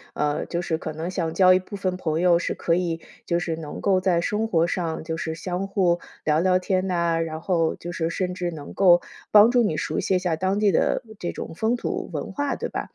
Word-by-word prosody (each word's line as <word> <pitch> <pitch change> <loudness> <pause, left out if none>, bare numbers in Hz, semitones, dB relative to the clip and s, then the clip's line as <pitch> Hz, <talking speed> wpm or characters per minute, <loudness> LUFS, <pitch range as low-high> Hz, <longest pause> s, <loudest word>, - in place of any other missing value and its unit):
呃， 150 0 0
就 175 0 -2
是 160 -2 -1
可 155 - -5
能 165 +4 -4
想 165 -4 -2
交 185 -1 +6
一 185 - +4
部 185 +2 -9
分 185 -2 -2
朋 160 -3 -1
友 175 -1 +5
是 - - -2
可 165 - 0
以， 170 -2 -1 0.3
就 170 - +1
是 170 -2 -2
能 155 -2 -7
够 190 -2 +2
在 185 -2 +2
生 210 +5 -1
活 170 -6 +2
上 170 -3 -2
就 160 0 -3
是 160 -1 -4
相 180 +3 -3
互 180 -3 +2 0.2
聊 155 0 +2
聊 185 +1 +3
天 185 0 0
呐， 170 -2 +1
然 160 -1 -3
后 165 -2 +1
就 175 - -7
是 165 -1 -2
甚 180 +1 -2
至 180 -1 -2
能 150 -4 -8
够 175 -3 +5 0.3
帮 215 +2 +8
助 245 -1 +4
你 160 -9 0
熟 155 - -2
悉 190 - +1
一 - - +3
下 180 -3 0
当 190 +5 0
地 210 -1 +4
的 190 - +1 0.2
这 175 - -3
种 - - -7
风 220 +8 0
土 245 - -4
文 - - -4
化， 285 -1 -1
对 - - -4
吧？ - - -5
175 Hz, 265 characters per minute, -24 LUFS, 165-190 Hz, 0.3 s, 帮